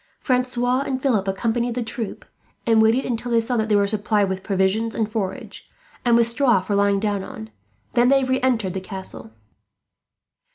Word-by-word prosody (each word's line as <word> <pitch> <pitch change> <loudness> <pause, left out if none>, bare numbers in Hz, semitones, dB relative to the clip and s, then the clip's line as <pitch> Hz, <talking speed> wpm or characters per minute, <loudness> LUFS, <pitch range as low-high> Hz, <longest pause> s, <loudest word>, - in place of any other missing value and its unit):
Francois 250 0 0
and 270 -2 -2
Philip 230 -8 +1
accompanied 230 +4 -1
the 250 - -1
troop, 225 -1 -6 0.4
and 225 -1 +4
waited 225 +4 +3
until 240 0 -3
they 235 -1 +3
saw 230 +2 -2
that 220 -1 0
they 210 - +3
were 200 0 +4
supplied 205 -1 +1
with 190 0 -3
provisions 200 +3 0
and 220 -1 -1
forage, 195 -4 -5 0.3
and 235 -1 +4
with 235 -1 +4
straw 240 -3 +3
for 190 +3 -4
lying 200 0 +2
down 205 -2 -1
on; 110 -10 -9 0.4
then 240 +1 +4
they 270 0 +4
re 260 0 0
entered 225 -8 +1
the 190 - -4
castle. 185 - -8
225 Hz, 180 wpm, -22 LUFS, 200-245 Hz, 0.4 s, and